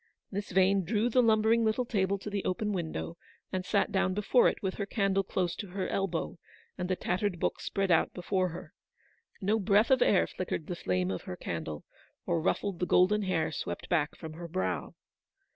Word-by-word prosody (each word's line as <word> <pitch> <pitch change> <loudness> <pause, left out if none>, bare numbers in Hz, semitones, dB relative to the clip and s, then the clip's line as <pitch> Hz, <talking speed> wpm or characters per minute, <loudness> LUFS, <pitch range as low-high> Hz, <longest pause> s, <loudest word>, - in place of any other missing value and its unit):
Miss 200 0 -4
Yane 190 +1 +4
drew 215 +6 +1
the 250 - +5
lumbering 225 0 +4
little 225 +3 +1
table 200 -4 0
to 200 - -7
the 200 -1 -2
open 210 +3 -1
window, 170 -1 -4 0.3
and 185 -1 -2
sat 200 +2 +1
down 190 -2 +1
before 210 +4 +4
it, - - 0
with 190 -1 -1
her 200 - -2
candle 195 -2 +1
close 180 -2 -1
to 205 - -5
her 190 +1 -3
elbow, 180 -4 -2 0.4
and 180 -1 -4
the 185 - +2
tattered 185 +1 -1
book - - -1
spread 195 -2 -1
out 165 - +3
before 185 +1 -1
her. 170 - -9 0.7
No 210 +3 +2
breath 205 +4 +3
of 260 - +5
air 195 - +4
flickered 175 -3 -4
the 180 - -4
flame 90 - -1
of 95 - -3
her 90 - -5
candle, 80 -3 -5 0.4
or 170 -2 0
ruffled 185 +2 -1
the 180 - 0
golden 210 +4 +4
hair 165 -5 0
swept - - -5
back 160 -4 +1
from 160 -2 -8
her 170 +2 -7
brow. 185 +3 -2
190 Hz, 195 wpm, -30 LUFS, 175-205 Hz, 0.7 s, the